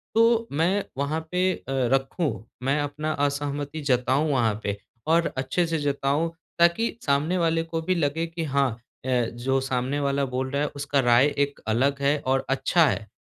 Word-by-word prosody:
तो 230 0 +4
मैं 175 +7 +1
वहाँ 140 +3 -1
पे 185 +1 +2
अ, - - -9
रखूँ। 135 - 0 0.2
मैं 135 +3 +1
अपना 150 +2 -3
असहमति 145 +1 -3
जताऊँ 130 +5 +2
वहाँ 115 -5 +1
पे 100 0 -2 0.3
और 165 +1 +3
अच्छे 135 +7 0
से 165 0 0
जताऊँ 145 +2 0 0.3
ताकि 170 +8 +3
सामने 150 +6 +1
वाले 165 -1 +1
को 165 0 -4
भी 185 +3 0
लगे 160 0 0
कि 165 0 -5
हाँ, 140 -3 +1 0.3
अ, - - -4 0.3
जो 130 +3 0
सामने 130 +2 -1
वाला 140 0 +1
बोल 130 0 -3
रहा 140 0 0
है 150 - +1
उसका 140 0 0
राय 120 +1 +5
एक 140 0 0
अलग 135 +5 +1
है 140 +2 +3
और 135 0 +1
अच्छा 160 +5 +3
है। 110 -4 -2
140 Hz, 175 wpm, -25 LUFS, 135-165 Hz, 0.3 s, राय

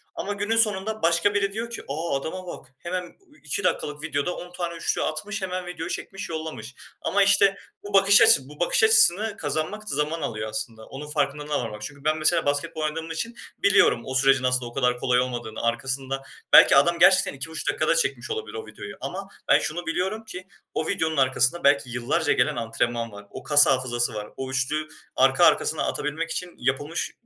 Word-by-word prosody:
ama 205 - -3
günün 205 +3 -1
sonunda 215 0 +1
başka 170 +4 +2
biri 200 -1 0
diyor 230 +2 -4
ki, 235 - -6
"A, 155 +3 -2
adama 180 +6 -6
bak! 175 - -9
Hemen 180 +1 -3
ü 305 - -21
2 150 +7 -2
dakikalık 150 -4 -2
videoda 145 +5 -2
10 175 - -9
tane 175 -1 -4
3'lü 165 - -1
atmış 205 +8 -4
hemen 185 -1 -4
video 175 -2 -6
çekmiş 195 -2 -6
yollamış" 155 -7 -6 0.3
ama, 200 0 +2
işte, 195 0 +4 0.3
bu 205 - -9
bakış 200 +1 +6
açı - - +7
bu 150 - -14
bakış 175 - +2
açısını 220 - +4
kazanmak 160 +8 -3
zaman 150 +3 -1
alıyor 110 -1 -4
aslında 110 +1 -6
onun 145 +2 -9
farkındalığına 145 0 -1
varmak 105 -3 -6
çünkü 140 +5 -9
ben 155 +1 +1
mesela 155 0 +2
basketbol 145 +2 -2
oynadığım 160 +2 -3
için 230 +9 -4 0.2
biliyorum 195 -11 +4
o 130 - -5
sürecin 135 0 +4
aslında 125 0 +1
o 120 - -9
kadar 125 -2 +1
kolay 125 -1 +2
olmadığını. 120 -3 -4
Arkasında 135 +3 -2 0.3
belki - - +9
adam 170 +5 +4
gerçekten 190 0 +5
2,5 155 +3 -5
dakikada - - +1
çekmiş - - -1
olabilir 445 0 -5
o 445 - -6
videoyu - - -9
ama - - -6 0.2
ben - - +5
şunu 175 +3 -3
biliyorum 190 +7 -2
ki 185 -3 -9 0.3
o - - -2
videonun 160 -5 -1
arkasında 130 +4 +2
belki 140 -2 +3
yıllarca 135 +7 0
gelen 125 - +1
antrenman 115 0 -2
var. 100 0 -11
O 130 - -9
kas 145 -1 +6
hafızası 125 -3 0
var. 105 -1 -5
O 130 0 -5
3'lü 145 +4 -1 0.3
arka - - +4
arkasına - - +2
atabilmek 155 +3 -3
için 180 -1 -5
yapılmış 145 +5 -2
155 Hz, 190 wpm, -24 LUFS, 130-185 Hz, 0.3 s, belki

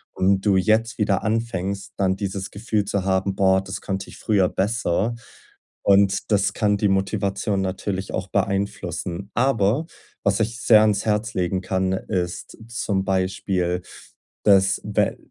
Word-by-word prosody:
und 95 +1 +2
du 100 -2 +4
jetzt 110 +5 +2
wieder 100 -2 +1
anfängst 100 -3 -2
dann 95 -1 +2
dieses 95 -1 -4
Gefühl 105 0 -1
zu 100 -1 -1
haben: 95 0 0
„Boah, 95 0 +3
das 95 +1 -6
konnte 95 0 -4
ich - - -12
früher 100 -4 +2
besser.“ 105 +1 0 0.7
Und 100 +1 +3
das 100 0 +2
kann 105 -2 +1
die 105 0 +1
Motivation 95 +1 0
natürlich 95 0 -3
auch - - -3
beeinflussen. 95 -1 -2
Aber 120 +2 +2 0.4
was 100 0 +2
ich 115 +2 -2
sehr 110 -2 +6
ans 105 -1 +2
Herz 110 +1 0
legen 90 +1 0
kann, 95 0 -1
ist 90 -2 -3
zum 100 -5 -1
Beispiel 95 -1 0 0.6
dass 95 -2 +4
we - - 0
100 Hz, 145 wpm, -23 LUFS, 95-105 Hz, 0.7 s, sehr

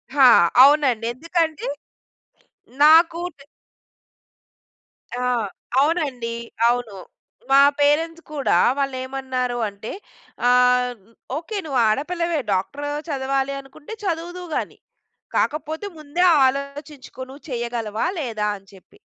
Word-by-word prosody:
ఆ! 275 -2 +6 0.4
అవునండి, 270 -5 +4
ఎందుకంటే, 325 +3 -2 1.2
నాకు 330 +2 +6 0.2
తె 275 - -16 1.7
ఆ! 250 0 -2 0.5
అవునండి, 275 -7 0 0.3
అవును. 240 -3 -1 0.6
మా 275 - +7 0.2
పేరెంట్స్ 325 +3 +1
కూడా 290 -3 0 0.2
వాళ్ళు 275 -2 -1
ఏమన్నారు 260 -2 -3
అంటే 200 +2 -8 0.6
ఆహ్, 250 0 +3 0.4
"ఒకే 345 +7 -5
నువ్వు 270 -5 0
ఆడపిల్లవే 335 +6 -1
డాక్టర్ 275 +10 -3 0.2
చదవాలి 270 -1 -1
అనుకుంటే, 275 +8 -12
చదువుదువు 350 0 -4
గాని, - - -3 0.6
కాకపోతే 315 +5 -1
ముందే, 310 +4 -2 0.2
ఆలోచించుకో 280 +1 -5
నువ్వు 275 +2 -13
చేయగలవా? 235 -3 -3
లేదా?" 220 -6 -2
అని 195 0 -26
చెప్పి. 195 - -20
275 Hz, 95 wpm, -22 LUFS, 250-315 Hz, 1.7 s, మా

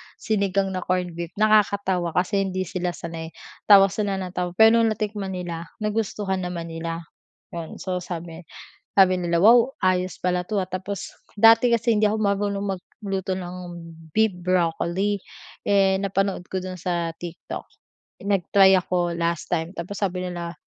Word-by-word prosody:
sinigang 195 -2 0
na 185 - -2
corned 180 -1 -1
beef, 170 +1 -7
nakakatawa 200 -5 +2
kasi 185 +3 +1
hindi 185 0 -2
sila 180 0 -3
sanay. 165 -1 -6 0.4
Tawa 195 -2 +8
sila 205 -2 -1
nang 185 -2 -4
tawa 180 -1 -3
pero 225 +2 +6
no'ng 225 -1 +2
natikman 205 -3 -3
nila, 170 -2 -5 0.2
nagustuhan 210 -2 -1
naman 175 -2 -5
nila. 165 +1 -4 0.5
'Yun 170 -2 -6
so 180 -1 -3
sabi 170 -1 -7 0.4
sabi 190 -2 +5
nila, 170 -2 0
"wow 235 +6 +6
ayos 185 -1 0
pala 180 0 0
'to, 205 +2 -2
ah," 185 - -2
tapos 190 +1 -5 0.3
dati 225 +2 +7
kasi 235 -1 +2
hindi 210 - +1
ako 215 +1 +2
marunong 200 -1 0
magluto 190 0 -5
ng 180 -1 -4 0.6
beef 220 -2 +2
broccoli, 185 +3 0 0.4
eh, 195 -1 +3
napanood 195 -1 0
ko 190 - -1
do'n 185 0 -6
sa 170 -2 -2
TikTok, 175 0 -7 0.6
nag-try 195 0 +4
ako 180 -1 +1
last 170 -1 -2
time, 165 0 -1
tapos 185 +4 -6
sabi 185 -2 -1
nila, 170 -1 -5
185 Hz, 155 wpm, -24 LUFS, 175-200 Hz, 0.6 s, Tawa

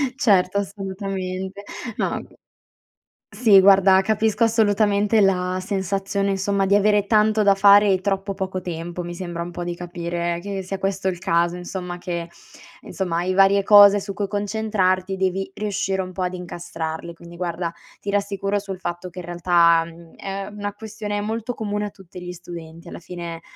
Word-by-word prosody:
Certo, 200 -6 +3
assolutamente. 195 -1 -4 0.3
No, - - 0
mhmm, - - -7 1.1
sì 210 -6 +6
guarda 190 0 +6
capisco 220 +2 +1
assolutamente 210 -1 +3
la 185 -1 +1
sensazione 195 +1 -1
insomma 195 0 0
di 200 - +3
avere 205 0 +3
tanto 215 -1 +3
da 200 -1 +5
fare 200 +1 +6
e 185 - -1
troppo 195 0 -1
poco 190 -1 -3
tempo, 175 0 -5
mi 175 0 -6
sembra 175 -2 -5
un 175 - -7
po' 175 - -5
di 175 0 -3
capire 170 0 -3
che 195 -1 -4
sia 195 +1 -4
questo 195 0 -2
il 180 -2 -1
caso, 175 -2 +1
insomma, 180 0 -6
che 170 -1 -5 0.5
insomma, 180 -3 -3
hai 180 +2 0
varie 195 +1 +5
cose 205 0 +8
su 200 - -6
cui 200 0 -2
concentrarti, 200 -3 0
devi 190 0 -1
riuscire 195 -2 -2
un 185 - -6
po' 185 0 -3
ad 180 - -2
incastrarle. 170 -2 -6
Quindi 170 0 -13
guarda, 170 -1 -3 0.3
ti 205 - -5
rassicuro 200 0 -1
sul 195 -2 -7
fatto 175 0 -5
che 180 - -10
in 180 - -7
realtà, 170 -1 +3
mhmm, 165 0 -14
è 195 0 -5
una 205 -1 -5
questione 210 -1 -5
molto 225 +3 -3
comune 210 -2 -3
a - - -4
tutti 185 -2 -13
gli 180 0 -6
studenti. 170 -1 -10
Alla - - -8
fine, 170 -1 -7
190 Hz, 170 wpm, -22 LUFS, 175-200 Hz, 1.1 s, cose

